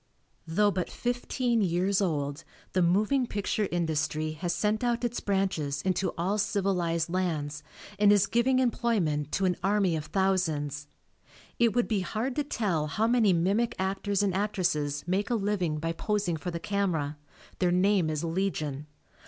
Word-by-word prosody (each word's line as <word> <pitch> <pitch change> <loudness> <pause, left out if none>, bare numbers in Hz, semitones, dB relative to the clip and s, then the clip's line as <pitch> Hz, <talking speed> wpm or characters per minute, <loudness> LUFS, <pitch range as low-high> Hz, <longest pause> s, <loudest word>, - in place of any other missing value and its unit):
Though 205 +6 +3
but 185 -2 -2
fifteen 245 -1 -1
years 190 +2 +1
old 145 -5 -1 0.3
the 185 - +2
moving 210 +9 +2
picture 205 0 -1
industry 155 -2 -1
has 170 +3 -3
sent 210 +6 0
out 240 0 0
its 240 0 -2
branches 185 -8 -1
into 190 0 0
all 190 +5 0
civilized 180 -5 0
lands 155 -5 -2 0.4
and 205 0 +6
is 205 -1 +5
giving 235 +6 +2
employment 210 - 0
to 195 - +1
an 180 -1 +1
army 195 -3 +2
of 155 -1 -4
thousands. 155 -6 0 0.7
It 235 -3 +3
would 245 - +2
be 215 -3 +1
hard 225 +7 -2
to 295 - +2
tell 190 - -1
how 210 +9 0
many 230 -3 +4
mimic 195 +7 +1
actors 195 +1 0
and 195 -2 +1
actresses 170 -8 -1
make 190 +5 0
a 240 - +1
living 195 -7 0
by 165 +2 -2
posing 200 0 -1
for 160 +3 -5
the 170 -1 -4
camera; 165 -7 -1 0.4
their 180 -1 +2
name 185 -2 +3
is 155 0 -2
legion. 160 -5 -2
190 Hz, 160 wpm, -28 LUFS, 160-210 Hz, 0.7 s, and